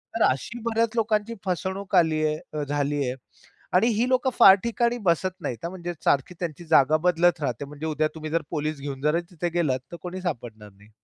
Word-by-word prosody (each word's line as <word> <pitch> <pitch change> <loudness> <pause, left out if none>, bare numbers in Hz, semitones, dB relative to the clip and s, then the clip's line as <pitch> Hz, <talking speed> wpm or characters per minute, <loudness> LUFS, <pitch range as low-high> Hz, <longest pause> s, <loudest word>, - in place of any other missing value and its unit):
तर 230 - +2
अशी 185 - -3
बऱ्याच 230 -1 +1
लोकांची 220 0 0
फसवणूक 190 +2 -2
आली 160 -3 +3
आहे. 155 0 0 0.2
अ, 150 -1 -2
झाली 145 0 0
आहे. 125 +1 -2 0.6
आणि 195 +6 +4
ही 235 +2 +1
लोकं 260 0 +2
फार 195 -4 +10
ठिकाणी 235 +1 0
बसत 185 +2 +1
नाहीत. 125 -6 -3
हां, 170 - -2
म्हणजे 175 -2 -5
सारखी 140 +5 +2
त्यांची 170 -1 -5
जागा 155 -1 +5
बदलत 175 -1 +3
राहते. 135 0 -2
म्हणजे 150 +2 -8
उद्या 155 0 +1
तुम्ही 155 -1 -6
जर 165 0 +1
पोलीस 155 -2 -2
घेऊन 135 -1 -6
जर 150 +3 +2
तिथे 175 0 -3
गेलात. 155 -7 0
तर - - -6
कोणी 180 +1 -6
सापडणार 115 - -5
नाही. 100 +2 -21
165 Hz, 200 wpm, -25 LUFS, 145-190 Hz, 0.6 s, फार